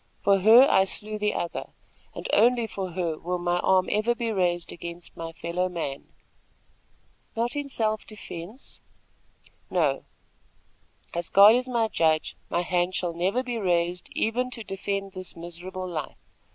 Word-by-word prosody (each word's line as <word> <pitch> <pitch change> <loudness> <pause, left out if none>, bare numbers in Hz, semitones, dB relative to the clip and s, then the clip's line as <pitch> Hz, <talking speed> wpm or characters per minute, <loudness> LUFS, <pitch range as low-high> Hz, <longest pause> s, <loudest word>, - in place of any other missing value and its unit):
For 200 -1 +4
her, 225 +7 +8
I 190 - +4
slew 215 +2 -5
the 210 0 0
other, 170 - -4 0.4
and - - -5
only 235 +2 +4
for 190 -4 -5
her 170 -3 -2
will 180 +1 -2
my 175 0 0
arm 185 0 +3
ever 215 +3 +2
be 235 -1 -2
raised 175 -4 0
against 170 0 -8
my 165 0 -6
fellow 170 +3 -2
man." 160 -6 -5 1.3
"Not 235 +1 0
even 290 +1 -2
in - - -14
self 215 -4 -1
defence?" 210 +2 -10 0.9
"No, 150 -7 +1 1.1
as 170 0 -3
God 200 +2 +8
is 250 +1 +1
my 235 -3 +1
judge, 160 -6 +1
my 175 - 0
hand 180 +1 0
shall 175 -3 -1
never 190 +9 0
be 245 -2 -3
raised 175 -2 0
even 245 +3 0
to 235 -2 -6
defend 195 0 -3
this 185 -1 -6
miserable 175 +2 -6
life. 165 -4 -5
185 Hz, 155 wpm, -26 LUFS, 175-220 Hz, 1.3 s, her